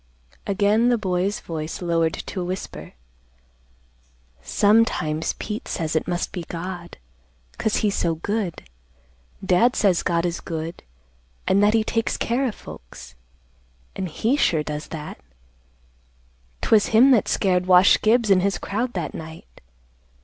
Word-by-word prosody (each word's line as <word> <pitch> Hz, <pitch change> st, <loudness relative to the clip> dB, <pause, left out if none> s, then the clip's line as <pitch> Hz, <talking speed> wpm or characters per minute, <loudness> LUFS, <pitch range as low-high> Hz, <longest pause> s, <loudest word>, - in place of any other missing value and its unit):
Again 210 Hz, +4 st, +2 dB
the 240 Hz, -, +3 dB
boy's 190 Hz, 0 st, -1 dB
voice 160 Hz, -1 st, -5 dB
lowered 165 Hz, -2 st, 0 dB
to 185 Hz, -, -6 dB
a -, -, -2 dB
whisper, 185 Hz, +2 st, -6 dB, 1.5 s
"Sometimes 165 Hz, -, +2 dB
Pete 210 Hz, 0 st, -6 dB
says 160 Hz, -1 st, -3 dB
it 160 Hz, -, 0 dB
must 175 Hz, 0 st, -2 dB
be 180 Hz, -, -5 dB
God, 175 Hz, 0 st, -6 dB, 0.6 s
'cause 220 Hz, -, 0 dB
he's 205 Hz, -, +1 dB
so 170 Hz, -4 st, 0 dB
good. 200 Hz, +1 st, -3 dB, 0.8 s
Dad 210 Hz, +8 st, +3 dB
says 190 Hz, -5 st, +2 dB
God 170 Hz, 0 st, 0 dB
is 175 Hz, -1 st, -2 dB
good 165 Hz, 0 st, -5 dB, 0.7 s
an' 195 Hz, -, +3 dB
that 205 Hz, +2 st, +4 dB
he 220 Hz, -, +3 dB
takes 225 Hz, +1 st, -1 dB
care 255 Hz, +3 st, 0 dB
of 220 Hz, -, -4 dB
folks, -, -, -12 dB, 0.8 s
an' 190 Hz, -, -3 dB
he 225 Hz, -, 0 dB
sure 160 Hz, -, +2 dB
does 150 Hz, 0 st, -5 dB
that. 155 Hz, -1 st, -8 dB, 1.4 s
'Twas 215 Hz, -2 st, +4 dB
him 240 Hz, +5 st, +5 dB
that 240 Hz, -5 st, +4 dB
scared 180 Hz, -2 st, +1 dB
Wash 185 Hz, +1 st, +6 dB
Gibbs 220 Hz, -1 st, +3 dB
an' 190 Hz, -, +6 dB
his 195 Hz, +1 st, 0 dB
crowd 235 Hz, +5 st, -3 dB
that -, -, -4 dB
night. 160 Hz, 0 st, -11 dB
185 Hz, 140 wpm, -23 LUFS, 165-215 Hz, 1.5 s, Wash